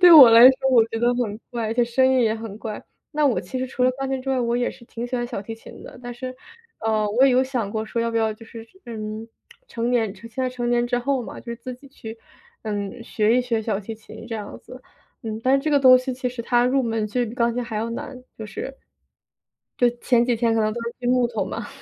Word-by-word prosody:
对 355 Hz, -2 st, +9 dB
我 270 Hz, -7 st, +11 dB
来 230 Hz, +1 st, +8 dB
说 265 Hz, 0 st, -1 dB
我 235 Hz, -3 st, +6 dB
觉 225 Hz, -, -4 dB
得 240 Hz, +1 st, +2 dB
很 220 Hz, -4 st, -2 dB
怪， 235 Hz, -2 st, -2 dB
而 -, -, -1 dB
且 240 Hz, -1 st, +3 dB
声 240 Hz, +2 st, +2 dB
音 260 Hz, -1 st, +3 dB
也 220 Hz, -2 st, +2 dB
很 220 Hz, -2 st, -7 dB
怪。 215 Hz, -2 st, -6 dB, 0.3 s
那 300 Hz, 0 st, +1 dB
我 255 Hz, -, +2 dB
其 260 Hz, -, -7 dB
实 260 Hz, -, -2 dB
除 250 Hz, -, -3 dB
了 255 Hz, -, +5 dB
钢 270 Hz, +1 st, -4 dB
琴 265 Hz, -1 st, -1 dB
之 270 Hz, -, -7 dB
外， 260 Hz, -, +1 dB
我 235 Hz, 0 st, 0 dB
也 245 Hz, -, +1 dB
是 235 Hz, -, -15 dB
挺 235 Hz, +1 st, -6 dB
喜 250 Hz, -, -5 dB
欢 240 Hz, -, -1 dB
小 235 Hz, -5 st, -5 dB
提 225 Hz, +2 st, -6 dB
琴 225 Hz, -, -13 dB
的， -, -, -11 dB
但 245 Hz, 0 st, -6 dB
是， 255 Hz, +1 st, -6 dB, 0.5 s
呃， 215 Hz, -1 st, +1 dB
我 250 Hz, +5 st, +4 dB
也 270 Hz, -, +5 dB
有 255 Hz, +1 st, +4 dB
想 245 Hz, -6 st, -2 dB
过 220 Hz, 0 st, -2 dB
说 230 Hz, +2 st, -3 dB
要 230 Hz, -, 0 dB
不 230 Hz, -, -2 dB
要 220 Hz, -1 st, +2 dB
就 225 Hz, +2 st, -13 dB
是， 225 Hz, 0 st, -10 dB, 0.2 s
嗯， 215 Hz, 0 st, -6 dB, 0.4 s
成 235 Hz, +1 st, -2 dB
年 225 Hz, -5 st, +1 dB
现 230 Hz, +4 st, -12 dB
在 255 Hz, +2 st, -1 dB
成 245 Hz, -1 st, -3 dB
年 240 Hz, 0 st, +2 dB
之 245 Hz, 0 st, 0 dB
后 265 Hz, +1 st, 0 dB
嘛， -, -, -8 dB
就 235 Hz, -1 st, -6 dB
自 250 Hz, +2 st, -7 dB
己 275 Hz, +2 st, -16 dB
去， 225 Hz, -4 st, -9 dB, 0.5 s
嗯， 210 Hz, +2 st, -4 dB
学 225 Hz, 0 st, +1 dB
一 -, -, +4 dB
学 230 Hz, -3 st, -1 dB
小 210 Hz, -3 st, -1 dB
提 220 Hz, +3 st, -7 dB
琴 225 Hz, +1 st, -12 dB
这 225 Hz, -, -4 dB
样 205 Hz, -1 st, -7 dB
子， 255 Hz, 0 st, -12 dB, 0.4 s
嗯。 220 Hz, -1 st, -5 dB
但 260 Hz, -, +3 dB
是 275 Hz, -, +3 dB
这 310 Hz, -, 0 dB
个 285 Hz, -, +5 dB
东 255 Hz, -1 st, +8 dB
西 255 Hz, 0 st, -3 dB
其 250 Hz, 0 st, -2 dB
实 245 Hz, -1 st, -6 dB
它 240 Hz, +1 st, +2 dB
入 265 Hz, +1 st, +2 dB
门 225 Hz, -2 st, -1 dB
就 245 Hz, +4 st, -1 dB
是 240 Hz, -, +1 dB
比 225 Hz, -, -7 dB
钢 235 Hz, -2 st, +1 dB
琴 245 Hz, +1 st, -2 dB
还 230 Hz, -2 st, -5 dB
要 225 Hz, +2 st, -1 dB
难， 255 Hz, +2 st, -6 dB, 0.2 s
就 220 Hz, -, -7 dB
是。 210 Hz, +6 st, -6 dB, 1.0 s
就 245 Hz, -, +5 dB
前 240 Hz, -1 st, +2 dB
几 240 Hz, -2 st, +1 dB
天 230 Hz, 0 st, +1 dB
可 225 Hz, -, +2 dB
能 215 Hz, 0 st, +2 dB
都 240 Hz, -, -4 dB
是 235 Hz, -, -5 dB
锯 245 Hz, -, -4 dB
木 250 Hz, -1 st, +3 dB
头 225 Hz, -2 st, -2 dB
嘛， -, -, -5 dB
240 Hz, 295 characters per minute, -23 LUFS, 225-255 Hz, 1.0 s, 我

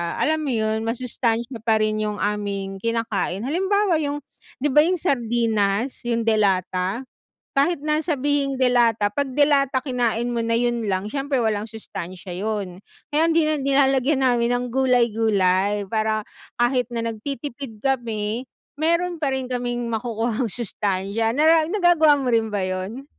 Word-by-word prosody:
alam 315 Hz, 0 st, +1 dB
mo 305 Hz, -, -3 dB
yun, 220 Hz, -2 st, 0 dB
masustansya 235 Hz, 0 st, -2 dB
pa 225 Hz, 0 st, +2 dB
rin 215 Hz, 0 st, +1 dB
yung 210 Hz, -1 st, -1 dB
aming 200 Hz, -2 st, -3 dB
kinakain. 225 Hz, -3 st, -1 dB
Halimbawa, 375 Hz, -, +1 dB
yung 290 Hz, -1 st, -3 dB, 0.4 s
di 295 Hz, -, +2 dB
ba, 300 Hz, -, +5 dB
yung 340 Hz, +5 st, +4 dB
sardinas, 235 Hz, -, 0 dB
yung 235 Hz, -1 st, 0 dB
de 220 Hz, -1 st, +2 dB
lata, 190 Hz, +2 st, 0 dB, 0.5 s
kahit 285 Hz, +5 st, +2 dB
na 305 Hz, +2 st, 0 dB
sabihing 285 Hz, -3 st, 0 dB
de 260 Hz, -, +3 dB
lata 230 Hz, -3 st, +3 dB
'pag 280 Hz, -2 st, -1 dB
de 285 Hz, +2 st, +3 dB
lata 275 Hz, -2 st, +2 dB
kinain 245 Hz, -3 st, -1 dB
mo 235 Hz, -, 0 dB
na 230 Hz, 0 st, +1 dB
yun 240 Hz, -1 st, 0 dB
lang, 190 Hz, +1 st, -1 dB
siyempre 275 Hz, +4 st, -1 dB
walang 220 Hz, -2 st, -1 dB
sustansiya 185 Hz, -4 st, -8 dB
yun. 200 Hz, -4 st, -3 dB, 0.3 s
Kaya 320 Hz, +2 st, +3 dB
hindi 325 Hz, -1 st, +3 dB
na 310 Hz, -, +1 dB
nilalagyan 270 Hz, -1 st, +2 dB
namin 240 Hz, -1 st, +2 dB
ng 245 Hz, 0 st, 0 dB
gulay-gulay, 210 Hz, -6 st, +2 dB
para 215 Hz, 0 st, -1 dB, 0.3 s
kahit 245 Hz, 0 st, +1 dB
na 230 Hz, -1 st, -3 dB
nagtitipid 240 Hz, +1 st, -6 dB
kami 235 Hz, -1 st, -2 dB, 0.3 s
meron 340 Hz, +1 st, +1 dB
pa 295 Hz, -, +1 dB
rin 265 Hz, -1 st, -1 dB
kaming 245 Hz, -1 st, -3 dB
makukuhang 230 Hz, +1 st, -1 dB
sustansiya 210 Hz, +1 st, -2 dB
nara 315 Hz, +1 st, +4 dB
nagagawa 345 Hz, -6 st, +4 dB
mo 260 Hz, -3 st, -1 dB
rin 225 Hz, -1 st, +2 dB
ba 205 Hz, -2 st, -2 dB
yun? 185 Hz, +8 st, -4 dB
240 Hz, 155 wpm, -23 LUFS, 215-275 Hz, 0.5 s, ba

